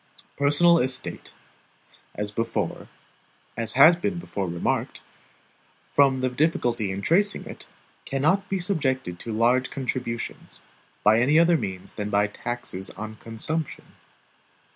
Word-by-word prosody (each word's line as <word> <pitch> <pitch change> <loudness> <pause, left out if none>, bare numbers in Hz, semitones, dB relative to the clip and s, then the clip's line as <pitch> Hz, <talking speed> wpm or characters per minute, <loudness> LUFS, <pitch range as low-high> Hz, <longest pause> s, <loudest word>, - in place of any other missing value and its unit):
Personal 155 +4 +4
estate 130 0 -1 0.8
(as 105 0 -4 1.4
has 155 +6 +8
been 180 +2 -2
before 100 - -4
remarked), 85 0 -2 0.9
from 135 -2 +4
the 130 - +1
difficulty 125 -6 0
in 95 +1 -4
tracing 200 +5 +2
it, - - -10 0.4
cannot 160 +9 0
be 195 - 0
subjected 130 - -1
to 115 - -6
large 120 +3 +2
contributions, 125 -3 -4 0.4
by 110 +2 +5
any 140 +6 +4
other 170 +1 +5
means 95 - -4
than 105 -1 -4
by 105 0 +3
taxes 105 -2 -5
on 110 0 -7
consumption. 140 +9 -5
130 Hz, 115 wpm, -25 LUFS, 110-160 Hz, 1.4 s, has